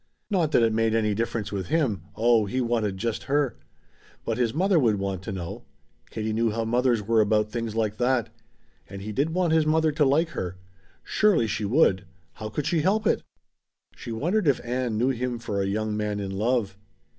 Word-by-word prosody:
Not 170 Hz, -6 st, +1 dB
that 120 Hz, -, +5 dB
it 115 Hz, -1 st, +2 dB
made 115 Hz, 0 st, +1 dB
any 105 Hz, -2 st, +1 dB
difference 115 Hz, 0 st, -2 dB
with 100 Hz, -2 st, -3 dB
him 130 Hz, -, 0 dB
oh, 115 Hz, -2 st, +3 dB
he 125 Hz, +6 st, -2 dB
wanted 115 Hz, -5 st, 0 dB
just 115 Hz, +2 st, -3 dB
her. 145 Hz, -2 st, +1 dB, 0.7 s
But 115 Hz, +1 st, -2 dB
his 120 Hz, -3 st, +2 dB
mother 180 Hz, -, +2 dB
would 115 Hz, -6 st, +3 dB
want 95 Hz, -2 st, -3 dB
to 100 Hz, -, -6 dB
know 90 Hz, -3 st, -6 dB, 0.5 s
Katie 110 Hz, 0 st, -3 dB
knew 115 Hz, +1 st, +1 dB
how 115 Hz, +1 st, -2 dB
mothers 120 Hz, -1 st, +1 dB
were 110 Hz, +2 st, +3 dB
about 105 Hz, 0 st, +1 dB
things 115 Hz, -2 st, -3 dB
like 110 Hz, -2 st, -1 dB
that. 125 Hz, -1 st, +1 dB, 0.6 s
And 100 Hz, 0 st, -8 dB
he 105 Hz, -, -5 dB
did 140 Hz, +8 st, 0 dB
want 180 Hz, -3 st, +2 dB
his 160 Hz, -1 st, +3 dB
mother 160 Hz, 0 st, +3 dB
to 150 Hz, +1 st, +1 dB
like 150 Hz, +5 st, +3 dB
her. 90 Hz, -, -5 dB, 0.5 s
Surely 205 Hz, -, +3 dB
she 105 Hz, -1 st, -2 dB
would. 100 Hz, -, +3 dB, 0.3 s
How 110 Hz, +5 st, -6 dB
could 140 Hz, +6 st, -3 dB
she 165 Hz, -3 st, +1 dB
help 210 Hz, +6 st, +1 dB
it? -, -, +2 dB, 0.7 s
She -, -, -8 dB
wondered 170 Hz, -, 0 dB
if 140 Hz, -, +3 dB
Ann 120 Hz, -2 st, -1 dB
knew 125 Hz, +4 st, +2 dB
him 125 Hz, -1 st, -2 dB
for 105 Hz, -4 st, -3 dB
a 95 Hz, -, -1 dB
young 105 Hz, +1 st, -1 dB
man 105 Hz, -1 st, -2 dB
in 100 Hz, -1 st, -4 dB
love. 105 Hz, -1 st, -1 dB
115 Hz, 205 wpm, -26 LUFS, 105-135 Hz, 0.7 s, that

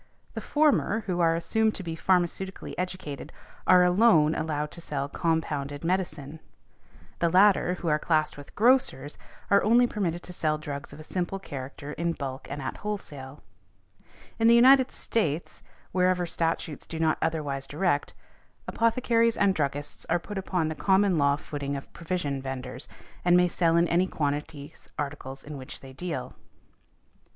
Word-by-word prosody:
The -, -, -5 dB
former, 295 Hz, -7 st, +2 dB
who 180 Hz, -4 st, -3 dB
are 165 Hz, -1 st, +3 dB
assumed 220 Hz, +6 st, +1 dB
to 195 Hz, -, -5 dB
be 165 Hz, -2 st, -4 dB
pharmaceutically 185 Hz, +2 st, -1 dB
educated, 180 Hz, -6 st, -5 dB, 0.4 s
are 180 Hz, -1 st, +7 dB
alone 180 Hz, -4 st, +5 dB
allowed 150 Hz, -2 st, -2 dB
to 170 Hz, -, -10 dB
sell 140 Hz, -4 st, -3 dB
compounded 145 Hz, -2 st, -2 dB
medicine, 160 Hz, -4 st, -2 dB, 0.8 s
the 170 Hz, -, +2 dB
latter 185 Hz, 0 st, +4 dB
who 175 Hz, -, -6 dB
are 150 Hz, -1 st, +2 dB
classed 155 Hz, -1 st, +1 dB
with 145 Hz, -1 st, -13 dB
grocers 220 Hz, -, +2 dB, 0.3 s
are 200 Hz, -, +5 dB
only 235 Hz, +4 st, +5 dB
permitted 175 Hz, -7 st, -2 dB
to 180 Hz, -, -9 dB
sell 155 Hz, -3 st, 0 dB
drugs 145 Hz, -2 st, -6 dB
of 145 Hz, -, -11 dB
a -, -, -9 dB
simple 180 Hz, +3 st, -3 dB
character 140 Hz, -4 st, -7 dB
in 170 Hz, +1 st, -1 dB
bulk 135 Hz, -3 st, -6 dB
and 140 Hz, 0 st, -5 dB
at -, -, -4 dB
wholesale. 145 Hz, -10 st, -6 dB, 1.0 s
In 225 Hz, -, +4 dB
the 235 Hz, -, +7 dB
United 260 Hz, +2 st, +6 dB
States, 165 Hz, -8 st, -1 dB, 0.3 s
wherever 180 Hz, -1 st, +2 dB
statutes 165 Hz, -2 st, -2 dB
do 165 Hz, -, -6 dB
not 160 Hz, -1 st, +1 dB
otherwise 145 Hz, -4 st, -2 dB
direct, 150 Hz, -1 st, -1 dB, 0.5 s
apothecaries 230 Hz, 0 st, +2 dB
and 200 Hz, -2 st, +3 dB
druggists 145 Hz, -2 st, -3 dB
are 175 Hz, -, +3 dB
put 195 Hz, +3 st, -6 dB
upon 180 Hz, -4 st, -1 dB
the 155 Hz, -, -2 dB
common 190 Hz, +4 st, +2 dB
law 140 Hz, 0 st, +3 dB
footing 145 Hz, -2 st, -5 dB
of 140 Hz, -, -8 dB
provision 165 Hz, -6 st, -3 dB
vendors, 130 Hz, 0 st, -6 dB, 0.4 s
and 175 Hz, 0 st, +5 dB
may 180 Hz, 0 st, +4 dB
sell 170 Hz, -1 st, +2 dB
in 170 Hz, +1 st, +4 dB
any 175 Hz, +3 st, +2 dB
quantities 145 Hz, -1 st, -4 dB
articles 140 Hz, -2 st, -5 dB
in 145 Hz, -1 st, -8 dB
which 130 Hz, -1 st, -9 dB
they 135 Hz, -1 st, -11 dB
deal. 135 Hz, -5 st, -5 dB
165 Hz, 160 wpm, -27 LUFS, 145-185 Hz, 1.0 s, are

